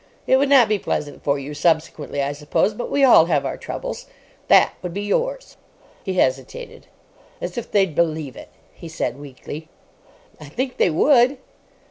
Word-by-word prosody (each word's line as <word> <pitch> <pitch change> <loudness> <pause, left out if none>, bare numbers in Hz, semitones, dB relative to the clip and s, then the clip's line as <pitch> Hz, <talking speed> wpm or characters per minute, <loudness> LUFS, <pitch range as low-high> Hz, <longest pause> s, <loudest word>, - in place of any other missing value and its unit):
It 260 - +4
would 275 +1 +1
not 265 -5 +6
be 210 -1 0
pleasant 145 -5 -4
for 140 0 +1
you 140 +2 -7
subsequently, 155 -2 0
I 140 - -1
suppose, 150 +8 0
but 240 +3 -5
we 280 - +1
all 240 -11 +7
have 150 -5 0
our - - -2
troubles. - - -6 0.4
That - - +5
would 180 -1 -6
be 200 - -3
yours." - - -2 0.5
He 190 -2 -3
hesitated. 130 -6 -2 0.5
"As 175 - -5
if 240 - -5
they'd 195 -5 +2
believe 155 -4 -1
it," - - -11 0.2
he 170 - -11
said, 140 -5 -4
weakly. 145 +3 -9 0.7
"I 155 - -10
think 250 - -4
they - - +3
would." 250 - +4
170 Hz, 170 wpm, -21 LUFS, 145-235 Hz, 0.7 s, all